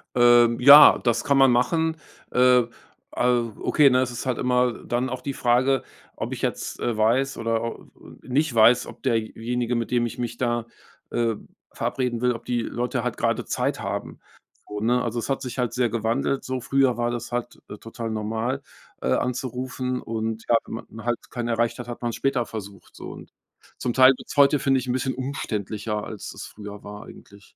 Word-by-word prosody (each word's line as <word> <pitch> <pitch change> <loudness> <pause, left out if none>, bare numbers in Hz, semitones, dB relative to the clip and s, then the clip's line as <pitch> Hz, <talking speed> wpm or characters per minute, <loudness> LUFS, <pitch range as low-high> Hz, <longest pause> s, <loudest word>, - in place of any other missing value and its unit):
Ähm, 120 -1 +5
ja, 140 +4 +10
das 120 -1 0
kann 140 -1 +2
man 135 -1 +6
machen. 160 +6 +1 0.3
Äh, 125 0 +5 0.6
äh - - 0 0.3
okay, 150 -2 +4
ne, 125 0 +3
es 125 -1 -1
ist 120 - -6
halt 130 -2 -1
immer 125 -1 +2
dann 125 +2 -1
auch 125 0 -5
die 140 - -4
Frage, 130 +1 +2 0.3
ob - - -4
ich - - -6
jetzt, - - -3
äh, 120 - -1
weiß 120 +6 +1
oder, 115 0 -2 0.4
äh, - - -18
nicht 135 +2 +1
weiß, 115 +2 +5
ob - - -12
derjenige, 120 0 -1
mit 115 -1 -2
dem 120 -1 +2
ich 120 - -6
mich 120 -1 -4
da, 120 -2 -1 0.5
äh, 115 -2 0 0.4
verabreden 125 -3 -2
will 125 0 +2
ob 115 0 -9
die 120 -1 -1
Leute 120 +1 -3
halt 125 -2 -3
grade - - 0
Zeit - - -1
haben. - - -5 0.5
So, 105 - -5
ne? 120 +4 +2
Also, 120 0 -3
es 115 - -5
hat 135 -1 -1
sich 125 -2 -6
halt 125 -2 -1
sehr 125 -2 +1
gewandelt, 115 +4 -1
so 130 0 -3
früher 135 0 +2
war 120 0 0
das 120 0 -5
halt, 120 0 -4
äh, 105 - -8
total 115 +1 -6
normal, 110 +5 -2 0.4
äh, - - -2
anzurufen 125 0 -2
und 110 0 -4
ja, 120 - +4
wenn 115 - -6
man 110 +1 -10
halt 120 -1 -3
keinen 120 -1 -3
erreicht 115 +1 0
hat, 120 - -7
hat 120 - -7
man's 120 -1 -2
später 130 -3 0
versucht 100 -2 -9
so - - -8
und - - -11 0.5
zum 120 - -1
Teil 130 +1 +7
wird's - - -10
heute, 140 +1 +5
finde 135 0 +2
ich, 125 - -7
'n 125 - 0
bisschen 130 +1 -1
umständlicher, 110 -5 -4
als 105 - -7
das - - -8
früher 105 -1 -10
war 105 0 -9
eigentlich. 100 0 -16
120 Hz, 200 wpm, -24 LUFS, 115-130 Hz, 0.6 s, ja